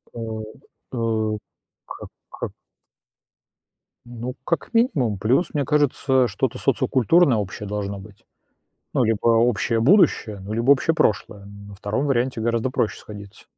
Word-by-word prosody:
А, - - -6 0.8
э, 110 -2 0 0.5
к - - -9 0.2
к - - -5 1.6
Ну, 120 +1 -6
как 170 +9 -2
минимум. 145 - +2
Плюс, 125 - +1
мне 145 -3 0
кажется, 135 -3 +2
что-то 110 +3 -2
социокультурное 135 +2 +3
общее 105 0 -5
должно 100 -1 -4
быть. 105 +3 -15 0.7
Ну, - - +2
либо 110 -1 0
общее 115 0 +2
будущее, 120 - +3
ну, 100 +3 -7
либо 115 +4 +1
общее 140 +4 +4
прошлое. 105 -6 0
На 100 0 -12
2 110 +9 -2
варианте 130 -2 0
гораздо 115 +2 0
проще 115 - -1
сходиться. 100 -2 -12
115 Hz, 130 wpm, -22 LUFS, 105-130 Hz, 1.6 s, общее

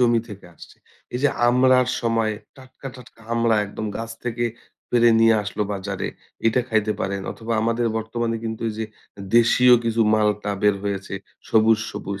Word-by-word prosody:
জমি 120 -2 +4
থেকে 100 -3 -10
আসছে। - - -15 0.4
এইযে 140 +3 +2 0.2
আমড়ার 125 0 +4
সময়, 115 -2 0 0.2
টাটকা, 130 +1 -11
টাটকা 120 -2 -16
আমড়া 115 -1 +2
একদম 110 +2 -6
গাছ 115 0 -5
থেকে 120 0 -2 0.5
পেরে 120 -1 +4
নিয়ে 115 0 +6
আসলো 105 +1 -3
বাজারে। 100 0 -4 0.4
এইটা 120 +3 +3
খাইতে 110 -1 +1
পারেন। 100 0 -2
অথবা, 115 0 -5
আমাদের 115 +1 0
বর্তমানে 115 +1 -2
কিন্তু 110 0 -4
এইযে 110 +1 -4 0.3
এ - - -8 0.2
দেশীয় 125 +1 +5
কিছু 115 0 0
মালটা 105 -1 +1
বের 105 -1 +4
হয়েছে 100 -1 -3 0.3
সবুজ, 110 0 +4
সবুজ। 100 0 -6
115 Hz, 155 wpm, -22 LUFS, 105-120 Hz, 0.5 s, নিয়ে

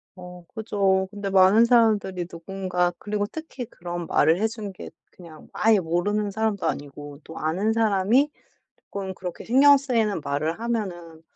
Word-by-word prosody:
어 180 -1 -11
그죠. 195 -4 0
근데 200 -1 -5
많은 195 +4 +6
사람들이 215 -7 +2
누군가 180 0 -2
그리고 205 0 -2
특히 280 0 -7
그런 175 -3 -7
말을 160 +4 +3
해 220 - +1
준 220 -3 -7
게 185 - -10 0.2
그냥 165 -4 -14
아예 220 -1 +3
모르는 190 +5 -1
사람도 220 -2 -1
아니고 145 0 -6
또 160 - -11
아는 190 +8 0
사람이 225 +5 +2 0.6
쪼끔 195 -1 -4
그렇게 180 -1 -7
신경 280 +4 +6
쓰이는 230 - 0
말을 155 +7 -2
하면은 180 -9 -4
195 Hz, 315 characters per minute, -24 LUFS, 175-220 Hz, 0.6 s, 많은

